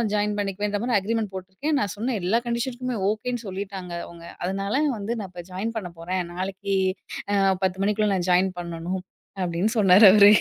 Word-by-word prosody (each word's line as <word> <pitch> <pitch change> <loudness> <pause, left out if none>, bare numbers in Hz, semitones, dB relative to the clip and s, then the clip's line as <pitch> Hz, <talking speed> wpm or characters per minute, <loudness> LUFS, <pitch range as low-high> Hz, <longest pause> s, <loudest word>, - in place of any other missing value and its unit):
Join 210 0 0
பண்ணிக்குவேன்ற 205 +1 -1
மாரி 240 -3 +3
agreement 215 0 -2
போட்ருக்கேன். 190 +12 -2
நா 205 - +1
சொன்ன 240 +3 -1
எல்லா 205 +6 +3
கண்டிஷனுக்குமே 245 +1 -2
ஓகேன்னு 245 +2 -3
சொல்லிட்டாங்க 190 -2 -5
அவுங்க. 170 0 -12 0.2
அதனால 195 +9 0
வந்து 210 +3 -2
நா 195 - -5
இப்போ 175 -1 -9
ஜாயின் 195 +5 -2
பண்ண 200 -5 -3
போறேன். 180 +2 -2
நாளைக்கு 195 +2 -3 0.6
அ - - +3 0.3
10 190 0 0
மணிக்குள்ள 210 +1 +2
நா - - 0
ஜாயின் 185 +1 +4
பண்ணணும். 170 +2 -4 0.4
அப்டின்னு 180 +5 0
சொன்னார் 195 +1 +7
அவரு. 205 0 +8
200 Hz, 165 wpm, -25 LUFS, 185-220 Hz, 0.6 s, அவரு